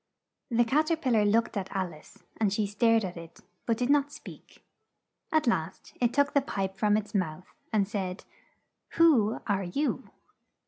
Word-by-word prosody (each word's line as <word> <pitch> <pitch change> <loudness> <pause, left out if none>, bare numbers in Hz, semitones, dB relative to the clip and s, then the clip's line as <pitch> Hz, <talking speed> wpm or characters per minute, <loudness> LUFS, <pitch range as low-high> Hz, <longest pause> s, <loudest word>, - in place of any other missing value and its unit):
The 240 -1 +3
Cat 305 +7 +2
er 330 - +3
pil 270 -6 -1
lar 215 -2 +4
looked 225 +3 +2
at 195 -2 -3
Al 185 -3 -1
ice, 155 - -17
and 210 -3 +1
she 210 +1 0
stared 225 +2 +2
at 180 - -6
it, 165 -1 -11 0.3
but 230 -2 +1
did 250 +3 +1
not 285 0 +2
speak. - - -13 0.7
At 315 -1 +2
last, 185 -7 -2
it 240 -1 +3
took 285 +1 +2
the 280 - +4
pipe 195 -7 -3
from 210 +2 +2
its 215 -1 -5
mouth 180 -3 -3 0.2
and 205 -3 +2
said, 190 -2 -4 0.7
"Who 260 -11 +4
are 200 -2 0
you?" 275 +12 -2
215 Hz, 180 wpm, -28 LUFS, 190-250 Hz, 0.7 s, lar